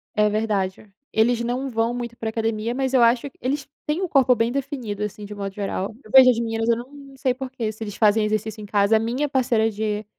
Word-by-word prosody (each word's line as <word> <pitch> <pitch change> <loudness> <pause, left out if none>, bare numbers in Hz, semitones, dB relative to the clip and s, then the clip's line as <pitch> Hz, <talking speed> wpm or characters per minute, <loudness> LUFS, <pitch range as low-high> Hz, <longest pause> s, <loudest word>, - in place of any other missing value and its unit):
É 210 0 +3
verdade. 205 -2 -2 0.2
Eles 235 +2 +3
não 250 +3 -2
vão 230 0 0
muito 235 -1 -5
para 225 - -3
academia, 225 +1 -2
mas 265 0 -1
eu 255 - +5
acho 235 +3 +4
eles 275 +3 -2 0.2
têm 305 +5 -1
o 370 - -1
corpo 260 -3 +4
bem 230 +1 +1
definido, 255 -7 -3
assim, 210 0 -5
de 210 - -8
um - - -11
modo 195 -1 -4
geral. 200 +1 -3
Eu 215 - -15
vejo 260 -1 +9
as 235 -2 +2
meninas, 225 0 -2
eu 235 - +5
não 275 +3 -10
sei 260 -1 +1
porquê, 255 -4 -4
se 220 +1 -8
eles 205 -2 -6
fazem 215 0 +3
exercício 215 0 -2
em - - -7
casa. 205 +1 +3
A - - +1
minha 245 +6 -1
parceira 240 -5 +2
de 215 0 -3
225 Hz, 235 wpm, -23 LUFS, 215-255 Hz, 0.2 s, vejo